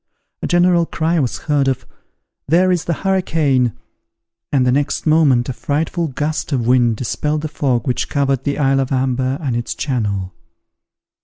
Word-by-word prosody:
A -, -, -2 dB
general 175 Hz, -1 st, +3 dB
cry 165 Hz, +1 st, 0 dB
was 130 Hz, -5 st, -1 dB
heard 145 Hz, -3 st, +2 dB
of, 135 Hz, -2 st, -1 dB, 0.6 s
"There 180 Hz, +5 st, +3 dB
is 175 Hz, -3 st, 0 dB
the 170 Hz, -, 0 dB
hurricane!" 155 Hz, -, +1 dB, 0.8 s
and 135 Hz, -3 st, +2 dB
the 125 Hz, -, +3 dB
next 140 Hz, +3 st, 0 dB
moment 150 Hz, -6 st, +3 dB
a 130 Hz, -, -3 dB
frightful 160 Hz, +6 st, -2 dB
gust 150 Hz, +3 st, -3 dB
of 125 Hz, -5 st, 0 dB
wind 120 Hz, -2 st, +3 dB
dispelled 150 Hz, +5 st, -2 dB
the 155 Hz, -, -3 dB
fog 130 Hz, -6 st, -1 dB
which 125 Hz, -, -1 dB
covered 140 Hz, -2 st, 0 dB
the 145 Hz, -, -1 dB
isle 135 Hz, -2 st, +2 dB
of 135 Hz, 0 st, -1 dB
Amber 130 Hz, 0 st, 0 dB
and 135 Hz, -7 st, -2 dB
its 120 Hz, 0 st, -3 dB
channel. 100 Hz, -, -2 dB
140 Hz, 165 wpm, -18 LUFS, 125-155 Hz, 0.8 s, general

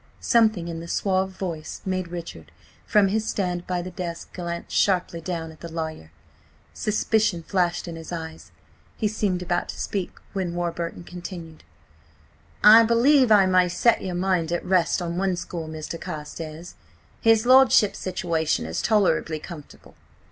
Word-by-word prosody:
Something 220 Hz, -7 st, +2 dB
in 165 Hz, -1 st, -5 dB
the 165 Hz, -, -8 dB
suave 190 Hz, +1 st, 0 dB
voice 175 Hz, -5 st, -6 dB
made 185 Hz, -1 st, -2 dB
Richard, 165 Hz, -, -8 dB, 0.4 s
from 205 Hz, -2 st, +4 dB
his 220 Hz, +2 st, -1 dB
stand 180 Hz, -3 st, -2 dB
by 180 Hz, -1 st, -1 dB
the 185 Hz, -, -7 dB
desk, 170 Hz, -1 st, -6 dB
glance 170 Hz, -1 st, -5 dB
sharply 180 Hz, -3 st, +1 dB
down 165 Hz, -2 st, -4 dB
at 155 Hz, -, -16 dB
the 170 Hz, -, -8 dB
lawyer. 160 Hz, -, -5 dB, 0.6 s
Suspicion 215 Hz, -4 st, 0 dB
flashed 175 Hz, -1 st, 0 dB
into 165 Hz, -1 st, -6 dB
his 160 Hz, -, -9 dB
eyes. 160 Hz, -2 st, -7 dB, 0.5 s
He 215 Hz, -, +1 dB
seemed 200 Hz, -4 st, -1 dB
about 175 Hz, 0 st, -1 dB
to -, -, -7 dB
speak, 195 Hz, -3 st, -3 dB, 0.2 s
when 185 Hz, -3 st, -2 dB
Warburton 170 Hz, 0 st, -3 dB
continued: 175 Hz, -2 st, -9 dB, 1.0 s
"I 220 Hz, +2 st, +10 dB
believe 240 Hz, +3 st, +4 dB
I 205 Hz, -2 st, +7 dB
may 185 Hz, -1 st, +3 dB
set 235 Hz, +6 st, +2 dB
your 185 Hz, -2 st, -4 dB
mind 175 Hz, -2 st, 0 dB
at 175 Hz, -, -2 dB
rest 180 Hz, -1 st, +2 dB
on 170 Hz, 0 st, -3 dB
one 190 Hz, -1 st, +1 dB
score, 170 Hz, -2 st, -6 dB
Mr. 155 Hz, +1 st, -6 dB
Carstares: 155 Hz, +2 st, -7 dB, 0.5 s
his 225 Hz, -1 st, +4 dB
lordship's 255 Hz, -5 st, +5 dB
situation 165 Hz, -, -1 dB
is 80 Hz, +1 st, -3 dB
tolerably 190 Hz, -7 st, +2 dB
comfortable. 155 Hz, -2 st, -11 dB
175 Hz, 155 wpm, -24 LUFS, 165-195 Hz, 1.0 s, I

